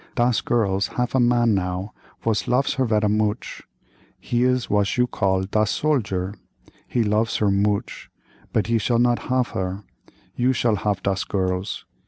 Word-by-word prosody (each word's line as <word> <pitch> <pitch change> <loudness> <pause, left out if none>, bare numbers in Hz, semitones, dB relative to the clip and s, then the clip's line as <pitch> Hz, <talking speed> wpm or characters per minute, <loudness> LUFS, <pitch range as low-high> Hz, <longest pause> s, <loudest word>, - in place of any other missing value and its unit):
Das 120 -1 +2
girls 100 -4 +1
haf 125 -1 0
a 130 - +3
man 120 -2 +3
now 90 +1 -2 0.3
vos 110 -2 0
lof 130 +3 +2
her 135 -2 0
vera 105 -1 +2
mooch—he 105 - -3
is 125 -1 +1
was 105 +1 +1
you 125 - +4
call 95 -5 0
das 105 +2 0
soldier; 100 -7 0 0.5
he 120 - +1
lofs 110 +2 +1
her 105 -2 +2
mooch 100 +1 -1 0.4
but 110 - +1
he 115 0 +1
shall 120 +3 +1
not 120 +1 +1
hof 125 -2 +1
her, 95 +2 -3 0.5
you 125 +2 +2
shall 115 -3 +1
hof 100 -1 -1
das 100 -1 0
girls. 95 0 -2
105 Hz, 160 wpm, -23 LUFS, 100-120 Hz, 0.5 s, you